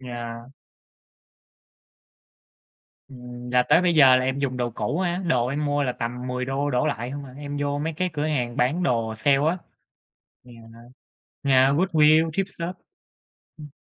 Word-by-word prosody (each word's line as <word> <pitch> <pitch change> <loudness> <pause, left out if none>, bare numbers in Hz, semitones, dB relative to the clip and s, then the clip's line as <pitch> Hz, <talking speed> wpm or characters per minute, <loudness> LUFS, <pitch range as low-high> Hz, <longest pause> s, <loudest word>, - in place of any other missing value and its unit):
Yeah. 120 -1 -7 2.6
Ừm, 125 -1 -10
là 125 0 +4
tới 175 - +6
bây 175 -2 +2
giờ 135 -4 +7
là 130 - +1
em 130 +1 -1
dùng 130 -2 -2
đồ 120 -1 -1
cũ 150 +8 -3
á, 175 -1 -1
đồ 125 -5 +2
em 145 +3 -2
mua 145 0 0
là 125 - -1
tầm 125 +1 -5
$10 135 +3 -2
đổ 125 +1 0
lại 120 -2 -3
hông 145 0 -6
à, 130 - -12
em 145 0 -6
vô 145 0 -1
mấy 160 +2 -3
cái 180 +3 -2
cửa 150 -1 -2
hàng 125 -6 -2
bán 145 +9 +1
đồ 115 -7 0
sale 135 +5 +2
á. 180 - -1 0.9
Yeah, 120 -2 -15 0.9
yeah 135 -1 +4
Goodwill, 160 -2 +4
thrift 195 +5 -1
shop, 170 +2 -5 0.8
ừm. 150 - -10
135 Hz, 165 wpm, -24 LUFS, 125-150 Hz, 2.6 s, giờ